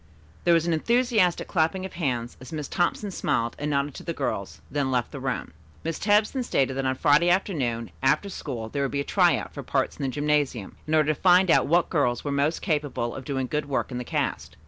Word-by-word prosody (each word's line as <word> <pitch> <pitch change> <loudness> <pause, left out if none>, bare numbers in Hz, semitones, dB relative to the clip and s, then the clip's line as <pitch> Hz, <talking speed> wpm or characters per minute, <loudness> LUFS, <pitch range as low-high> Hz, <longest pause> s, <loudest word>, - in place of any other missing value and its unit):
There 175 - +5
was 165 -1 +2
an 170 - +1
enthusiastic 225 0 +2
clapping 185 +2 0
of 190 - -8
hands 125 -8 -2
as 130 - -10
Miss 150 -3 -4
Thompson 190 +3 -1
smiled 120 -9 -1
and 150 +1 -2
nodded 140 0 0
to - - -9
the - - -3
girls, - - -3
then 140 -2 0
left 125 -2 0
the 140 - -6
room. 130 -9 -3 0.3
Miss 165 -1 -3
Tebbs 210 +1 +3
then 265 - -2
stated 135 - 0
that 135 0 -1
on 130 - 0
Friday 150 +5 +4
afternoon 135 - 0
after 135 +9 +2
school 130 - -5
there 140 +5 -3
would 140 - 0
be 140 +1 -1
a - - -2
"try - - +3
out" - - -7
for - - -6
parts - - -1
in - - -7
the 135 - 0
gymnasium, 145 -6 -1
in 155 - +1
order 155 0 +3
to - - -15
find 180 -1 +5
out - - +4
what 170 +4 +2
girls 125 -7 +1
were 145 - -2
most 140 +3 0
capable 145 - -1
of 130 - -8
doing 135 -1 -1
good 150 +2 -3
work 135 - -1
in 125 - -3
the - - -3
cast. 115 - -3
145 Hz, 235 wpm, -26 LUFS, 130-175 Hz, 0.3 s, There